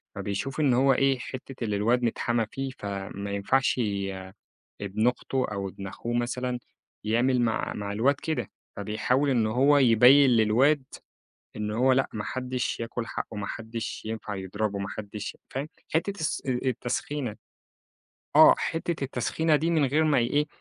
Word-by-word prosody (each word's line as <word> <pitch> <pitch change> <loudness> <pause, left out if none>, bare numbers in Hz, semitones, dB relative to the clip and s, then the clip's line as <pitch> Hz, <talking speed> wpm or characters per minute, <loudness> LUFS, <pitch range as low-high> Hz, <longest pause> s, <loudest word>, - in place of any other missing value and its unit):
فبيشوف 105 +9 -3
إن 145 -4 +3
هو 135 +2 +4
إيه، 135 0 +2
حتّة 130 0 -7
إن 105 - -2
الواد 115 +5 +2
متحامى 120 0 0
فيه، 135 0 -3
فما 100 0 -5
ينفعش 125 +7 +1 1.0
ابن 100 +4 +1
أخته 130 +1 -1
أو 100 -1 -3
ابن 100 +1 -8
أخوه 120 +5 -5
مثلًا 125 +1 -1 0.5
يعمل 120 +4 +2
مع 115 -2 0
مع 100 -1 -4
الواد 120 +7 +3
كده، 140 -6 -3 0.3
فبيحاول 115 +7 0
إن 120 -4 +2
هو 135 +6 +4
يبيّن 130 +2 +7
للواد 125 +6 +3 0.7
إن 105 0 -3
هو 125 +4 +3
لأ، 135 +1 +1
ما 105 - -3
حدّش 130 0 -3
ياكُل 115 0 -4
حقُّه، 110 - -5
ما 100 -1 -3
حدّش 115 0 -5
ينفع 110 -2 -4
يضربه، 100 +2 -3
ما 100 0 -4
حدّش 105 0 -6
فاهم؟ 135 +3 -4 0.3
حتّة 195 +5 0
الس 155 - -2
آآ 130 -2 0
التسخينة 125 0 -3 1.0
آه. - - +9
حتّة 165 -2 -2
التسخينة 135 +5 +1
دي 160 +3 0
من 160 -3 +3
غير 150 +4 +2
ما 150 -4 +3
ي 120 - +2
إيه، 145 +4 +1
120 Hz, 155 wpm, -27 LUFS, 105-135 Hz, 1.0 s, آه